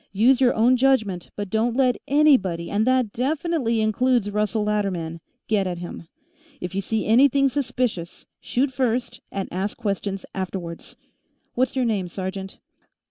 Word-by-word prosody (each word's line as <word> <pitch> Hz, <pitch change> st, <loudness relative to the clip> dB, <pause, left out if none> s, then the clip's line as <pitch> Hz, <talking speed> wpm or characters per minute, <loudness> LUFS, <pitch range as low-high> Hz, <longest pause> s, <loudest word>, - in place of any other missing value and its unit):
Use 245 Hz, +6 st, +4 dB
your 250 Hz, -2 st, +4 dB
own 245 Hz, +3 st, +4 dB
judgment, 220 Hz, -9 st, +1 dB
but 205 Hz, -2 st, -5 dB
don't 225 Hz, +2 st, +1 dB
let 255 Hz, -3 st, +3 dB
anybody, 255 Hz, -, +3 dB
and 215 Hz, +3 st, +1 dB
that 255 Hz, -5 st, +2 dB
definitely 270 Hz, -3 st, 0 dB
includes 220 Hz, 0 st, +1 dB
Russell 210 Hz, +1 st, 0 dB
Latterman, 190 Hz, -6 st, -2 dB, 0.3 s
get 205 Hz, -4 st, +1 dB
at 175 Hz, -1 st, -3 dB
him. 175 Hz, -1 st, -8 dB, 0.5 s
If 180 Hz, 0 st, -5 dB
you 195 Hz, -, -1 dB
see 220 Hz, +2 st, -2 dB
anything 275 Hz, +4 st, +4 dB
suspicious, 245 Hz, -9 st, -2 dB
shoot 265 Hz, +2 st, -1 dB
first 250 Hz, -1 st, -1 dB
and 195 Hz, -1 st, -3 dB
ask 190 Hz, +3 st, -2 dB
questions 200 Hz, -3 st, -3 dB
afterwards. 180 Hz, -3 st, -5 dB, 0.6 s
What's 255 Hz, +2 st, 0 dB
your 260 Hz, -2 st, +1 dB
name, 205 Hz, -6 st, 0 dB
sergeant?" 190 Hz, +2 st, -6 dB
220 Hz, 145 wpm, -23 LUFS, 190-255 Hz, 0.6 s, Use